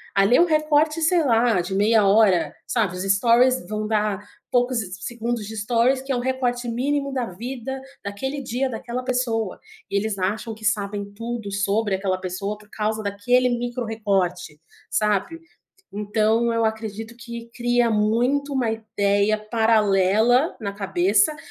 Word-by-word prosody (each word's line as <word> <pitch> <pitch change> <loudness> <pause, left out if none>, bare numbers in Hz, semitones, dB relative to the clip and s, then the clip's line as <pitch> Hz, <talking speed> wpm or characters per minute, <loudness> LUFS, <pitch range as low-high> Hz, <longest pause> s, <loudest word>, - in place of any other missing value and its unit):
Ali 195 +5 +4
é - - +5
um 350 - +6
recorte, 305 0 +2
sei 325 +1 +3
lá, 230 -5 +3
de 185 +2 -5
meia 210 +1 +3
hora, 195 -7 +4
sabe 210 -7 0
os 180 - -4
stories 230 +5 +4 0.2
vão 215 0 -3
dar 210 -2 0 0.3
poucos 245 0 +2
se 190 -5 -3
se 185 - -9
segundos 235 -2 -3
de 220 +1 -7
stories 240 +5 +2
que 270 +1 -5
é - - +1
um - - -1
recorte 245 -1 -1
mínimo, 275 +4 -1
da 255 -2 -1
vida, 250 +6 -6 0.2
daquele 265 +8 -4
dia, 260 +1 -2
daquela 240 +2 -5
pessoa. 235 -5 -1 0.3
Eles 200 0 -1
acham 215 +4 -2
que 220 - -14
sabem 205 -1 -1
tudo 230 -1 -5
sobre 205 +1 0
aquela 190 -1 -1
pessoa 190 +3 -4
por 210 0 -20
causa 215 0 -2
daquele 245 +5 +2
micro-recorte, 210 -9 -2 0.3
sabe? 210 - 0 0.5
Então, 220 +3 +1
eu 230 0 +1
acredito 220 +1 -4
que 235 -1 -9
cria 240 -1 +2
muito 245 +7 +1
uma 245 -4 +1
ideia 210 -1 +1
paralela 220 - +2
na 200 -2 -3
cabeça, 200 - +2
220 Hz, 155 wpm, -23 LUFS, 205-245 Hz, 0.5 s, um